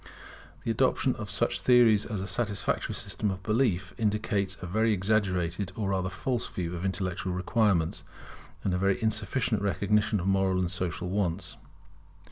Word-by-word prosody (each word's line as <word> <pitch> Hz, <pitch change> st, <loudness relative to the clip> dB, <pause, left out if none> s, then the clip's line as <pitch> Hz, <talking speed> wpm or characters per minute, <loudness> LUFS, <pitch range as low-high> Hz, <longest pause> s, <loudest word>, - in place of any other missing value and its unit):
The -, -, 0 dB
adoption -, -, +2 dB
of -, -, -6 dB
such -, -, 0 dB
theories 115 Hz, -4 st, +5 dB
as 105 Hz, -3 st, -3 dB
a 95 Hz, -, -4 dB
satisfactory 105 Hz, -2 st, -1 dB
system 105 Hz, -, -2 dB
of 95 Hz, -1 st, -5 dB
belief, 105 Hz, -5 st, +1 dB
indicates 105 Hz, -2 st, 0 dB
a -, -, -6 dB
very 110 Hz, +5 st, +2 dB
exaggerated 95 Hz, -2 st, 0 dB
or 105 Hz, -3 st, -2 dB
rather 95 Hz, -1 st, 0 dB
false 120 Hz, +6 st, -2 dB
view 90 Hz, -1 st, -4 dB
of 85 Hz, -, -5 dB
intellectual 95 Hz, -1 st, -2 dB
requirements, 90 Hz, -3 st, +1 dB, 0.6 s
and 95 Hz, -, 0 dB
a 90 Hz, -, 0 dB
very 100 Hz, 0 st, +2 dB
insufficient 110 Hz, 0 st, 0 dB
recognition 105 Hz, +1 st, +1 dB
of 90 Hz, -, -4 dB
moral 95 Hz, -1 st, +2 dB
and 90 Hz, -1 st, 0 dB
social 90 Hz, -1 st, -2 dB
wants. 95 Hz, -1 st, -1 dB
95 Hz, 155 wpm, -28 LUFS, 90-105 Hz, 0.6 s, theories